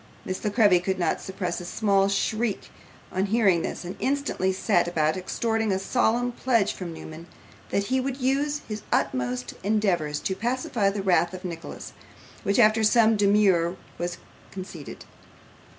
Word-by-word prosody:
Miss 185 - -4
La 210 - +1
Creevy 205 -4 +5
could 190 +2 -2
not 175 -3 0
suppress 180 -2 -4
a - - -7
small 195 +1 +2
shriek 215 +2 -1 0.4
on 190 +2 0
hearing 200 -5 +3
this, - - -4
and 180 - -5
instantly 275 -9 0
set 190 0 +1
about 155 -2 +1
extorting 220 +3 -1
a 190 - +1
solemn 245 +4 +1
pledge 240 -3 +1
from 180 -3 -6
Newman 160 +1 -9 0.4
that 200 - +1
he 260 +6 0
would 265 0 -3
use 280 +3 0
his 215 -1 -5
utmost 125 0 -1
endeavours 185 -8 +1
to 190 - -2
pacify 235 -2 0
the 200 0 -3
wrath 180 -1 +2
of 185 +1 -9
Nicholas; 165 -2 -7 0.5
which, 200 - 0
after 220 -1 +5
some 220 0 +5
demur, 200 -4 +3 0.2
was 175 0 -3 0.3
conceded. 185 -6 -9
195 Hz, 155 wpm, -26 LUFS, 175-225 Hz, 0.5 s, Creevy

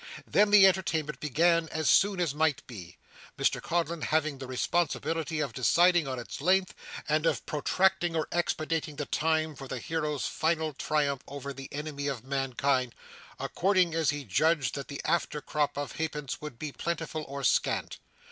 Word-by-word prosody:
Then 210 0 +3
the 205 -1 +8
entertainment 165 -5 +1
began 165 +3 +2
as 155 -2 -2
soon 200 -1 +4
as 170 -6 0
might 150 -2 +1
be; 90 -8 -10 0.4
Mr - - +1
Codlin 170 -1 -1
having 155 -3 0
the 130 - -7
responsibility 160 +3 -1
of 140 -6 -2
deciding 170 +6 +4
on 130 -1 -3
its 120 +2 -7
length 185 +3 +2 0.3
and 155 +2 +2
of - - 0
protracting 175 +2 +1
or 160 - 0
expediting 160 -3 -1
the 145 0 -3
time 160 +1 0
for 135 -1 -9
the 130 - -4
hero's 150 +1 -2
final 160 -1 0
triumph 140 -1 0
over 140 0 -6
the 135 0 -9
enemy 145 -1 -4
of 130 -5 -3
mankind, 135 -1 0 0.4
according 185 -3 +1
as 160 -2 +1
he 145 -1 -1
judged 145 - +1
that 140 - -5
the 140 - -6
after 160 -2 0
crop 150 0 -1
of 145 0 -3
half 160 0 -2
pence 150 -3 -5
would 150 -5 -7
be 150 +3 -5
plentiful 165 0 -3
or 140 0 -6
scant. - - +1
155 Hz, 170 wpm, -29 LUFS, 140-165 Hz, 0.4 s, the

